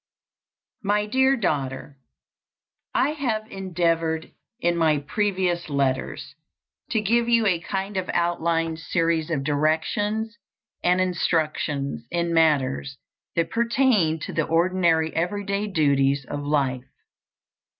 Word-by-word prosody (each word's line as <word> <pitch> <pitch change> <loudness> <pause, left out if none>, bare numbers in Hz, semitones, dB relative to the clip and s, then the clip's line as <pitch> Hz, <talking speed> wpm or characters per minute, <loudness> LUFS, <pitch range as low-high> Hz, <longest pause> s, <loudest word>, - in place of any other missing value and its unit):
My 210 +1 +1
Dear 265 +4 +3
Daughter: 140 - -2 0.9
I - - +2
have 240 -8 -2
endeavored 165 -4 -1 0.3
in 175 -6 +1
my 160 -3 +3
previous 180 +2 -1
letters 135 -1 -1 0.6
to 220 - +1
give 235 +3 +2
you 230 -2 +4
a 180 -5 +2
kind 195 +3 -4
of 185 - -2
outline 165 -1 0
series 165 -1 0
of 150 -5 -1
directions 165 +10 0 0.4
and 180 +1 +3
instructions 155 -7 -1
in 170 0 -1
matters 140 - +2 0.4
that 170 -1 0
pertain 230 -8 +2
to - - -5
the 155 - +1
ordinary 165 -1 +2
every 200 +5 -1
day 200 +2 -1
duties 140 -6 +2
of 145 - -4
life. 135 -3 0
170 Hz, 115 wpm, -24 LUFS, 155-200 Hz, 0.9 s, you